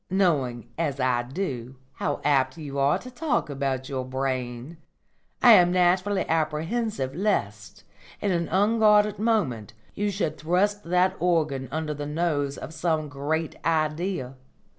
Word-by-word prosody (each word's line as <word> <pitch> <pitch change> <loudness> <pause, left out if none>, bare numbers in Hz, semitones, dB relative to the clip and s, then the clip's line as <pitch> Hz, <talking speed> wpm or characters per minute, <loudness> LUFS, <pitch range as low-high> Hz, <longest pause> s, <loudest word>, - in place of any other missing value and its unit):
Knowing, 145 - +1
as 145 -4 -1
I 125 -2 +2
do, 130 -3 -5 0.2
how 145 - -2
apt 140 +2 +2
you 140 -3 -5
are 140 +1 +3
to 255 - -10
talk 245 - -1
about 135 -2 -2
your 130 -2 -3
brain, 130 +2 -3 0.7
I - - +9
am 175 0 +6
naturally 185 +2 +2
apprehensive 160 - -1
lest, 105 - -2 0.4
in 200 - 0
an 170 -2 0
unguarded 210 +1 +3
moment, 150 - 0 0.2
you 205 0 -1
should 175 -6 -2
thrust 200 +6 +1
that 180 +2 +2
organ 155 -6 +1
under 155 0 -3
the 145 0 -5
nose 150 -3 -1
of - - -8
some 160 -2 -1
Great 150 +3 -2
Idea. 155 -3 -1
155 Hz, 140 wpm, -26 LUFS, 135-185 Hz, 0.7 s, I